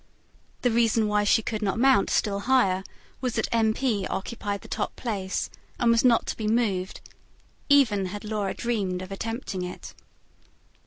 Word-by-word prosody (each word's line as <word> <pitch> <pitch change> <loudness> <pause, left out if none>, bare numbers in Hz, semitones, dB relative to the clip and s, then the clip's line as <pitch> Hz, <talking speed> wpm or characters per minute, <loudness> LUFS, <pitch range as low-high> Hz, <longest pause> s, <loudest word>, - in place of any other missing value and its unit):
The 245 - +3
reason 225 -1 +3
why 210 0 +2
she 220 +2 +3
could 215 0 -3
not 200 -1 0
mount 260 -3 +4
still 200 -2 +1
higher 200 -6 +2 0.4
was 250 -3 -2
that 220 - 0
M. 225 -2 +3
P. 220 -5 -1
occupied 205 0 -4
the - - -12
top 210 - -3
place, 195 -6 -3 0.3
and 235 -1 +3
was 230 0 +3
not 240 -3 +4
to - - -4
be 215 - -2
moved, 210 -5 0 0.7
even 225 -9 +4
had 205 +3 -7
Laura 210 -2 -2
dreamed 195 -6 -2
of 185 - -10
attempting 225 -1 -4
it. 180 0 -7
215 Hz, 165 wpm, -26 LUFS, 195-235 Hz, 0.7 s, mount